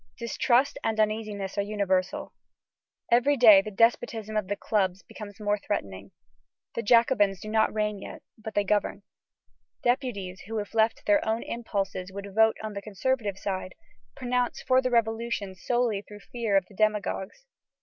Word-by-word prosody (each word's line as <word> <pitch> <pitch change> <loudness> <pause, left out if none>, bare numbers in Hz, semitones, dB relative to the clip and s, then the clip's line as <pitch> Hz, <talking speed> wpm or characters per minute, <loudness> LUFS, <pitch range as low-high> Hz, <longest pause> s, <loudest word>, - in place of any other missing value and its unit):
Distrust 240 +3 +1
and 220 -1 -1
uneasiness 210 -2 -1
are - - +4
universal. 200 -3 -1 0.8
Every 260 +5 +4
day 215 -5 +8
the 215 - -6
despotism 225 0 +1
of 210 -3 0
the 205 - -1
clubs 195 -3 -1
becomes 205 0 -10
more 205 0 0
threatening. 100 - -4 0.6
The - - -2
Jacobins 230 -4 +3
do 215 - -8
not 220 0 +2
reign 210 -1 -1
yet, - - -9
but 220 -1 -9
they 205 - +3
govern. 205 0 0 0.8
Deputies 240 -8 -1
who, 225 +1 -4
if 205 0 -4
left 225 0 +3
to - - -22
their 305 -1 +3
own 220 +1 -1
impulses, 195 -5 -3
would 200 0 -8
vote 220 +1 +4
on 215 -1 -4
the 200 - -5
conservative 210 0 -2
side, 190 -2 -4 0.4
pronounce 250 -1 -1
for 260 0 +4
the 255 - 0
Revolution 225 -3 0
solely 225 +2 0
through 210 0 -13
fear 225 -4 0
of 190 - +1
the 205 - -19
demagogues. 215 - -1
215 Hz, 160 wpm, -27 LUFS, 200-230 Hz, 0.8 s, day